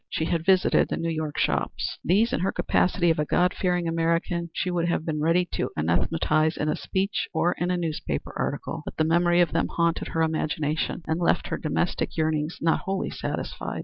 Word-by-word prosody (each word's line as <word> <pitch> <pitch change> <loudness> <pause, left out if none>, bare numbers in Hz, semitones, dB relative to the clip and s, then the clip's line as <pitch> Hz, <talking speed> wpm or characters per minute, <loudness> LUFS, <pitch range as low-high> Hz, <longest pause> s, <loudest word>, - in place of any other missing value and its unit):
She 160 - -1
had 165 -1 -1
visited 185 0 +3
the - - -2
New 165 0 -1
York 155 -2 -3
shops. - - -1
These, 210 +7 +3
in - - +1
her 185 +3 0
capacity 175 -2 +2
of 160 - -1
a 150 - +1
God 180 +4 +2
fearing 180 -2 0
American, 165 +1 0
she 180 - -2
would 170 -1 0
have 165 - -1
been 155 -2 -2
ready 170 +3 +3
to - - -1
anathematize 155 - +1
in 150 - -1
a 150 - +1
speech 190 +6 -1
or 165 +2 +3
in 175 - 0
a 180 - +1
newspaper 155 - -3
article, - - -3
but - - -8
the - - +3
memory 175 +2 +3
of 170 - +2
them 165 - +1
haunted 170 -1 0
her 165 - 0
imagination 155 0 -1
and 160 +1 -1
left 170 - +1
her - - -1
domestic 165 +3 -1
yearnings 155 0 0
not 165 0 +2
wholly 195 0 -2
satisfied. - - -4
165 Hz, 205 wpm, -26 LUFS, 155-175 Hz, -, visited